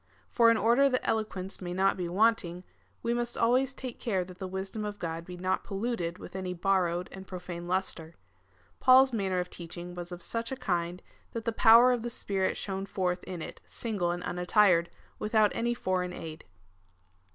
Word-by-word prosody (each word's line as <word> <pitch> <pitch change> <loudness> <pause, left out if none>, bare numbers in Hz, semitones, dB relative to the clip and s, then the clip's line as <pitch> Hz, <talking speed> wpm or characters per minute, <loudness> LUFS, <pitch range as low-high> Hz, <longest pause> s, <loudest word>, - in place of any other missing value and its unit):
For 230 -2 +5
in 230 - +4
order 240 +6 +4
that 255 -1 -1
eloquence 205 -4 -2
may 175 -1 -4
not 190 +2 +3
be 180 -2 -3
want 225 +5 +3
ing, 175 +1 -7 0.4
we 235 - +1
must 240 0 -2
always 250 +3 +3
take 255 -2 -7
care 195 -7 0
that 180 0 -13
the 190 - -4
wisdom 190 +3 -4
of 205 0 -4
Grod 165 -2 -4
be 180 0 -8
not 185 +1 -1
polluted 195 -4 -2
with - - -11
any 185 -1 -3
borrowed 180 -1 +1
and 190 0 -10
profane 175 -2 -6
lustre. 175 -3 -2 0.6
Paul's 260 0 +6
manner 190 -4 0
of 180 0 -3
teaching 175 +1 -7
was 175 0 -7
of 175 0 -7
such 230 +1 -3
a - - -1
kind, 175 -6 -2 0.3
that 230 -1 -4
the 230 - +1
power 230 +2 +7
of 245 -2 0
the 240 - -3
Spirit 195 -5 -1
shone 195 0 -4
forth 180 -2 -1
in 175 -3 -5
it - - -9
single 205 -7 -2
and 175 +1 -2
unattired, 180 -1 +3 0.3
without 215 -1 +3
any 240 +1 0
foreign 180 -4 -1
aid. 160 -2 -8
190 Hz, 190 wpm, -29 LUFS, 180-230 Hz, 0.6 s, power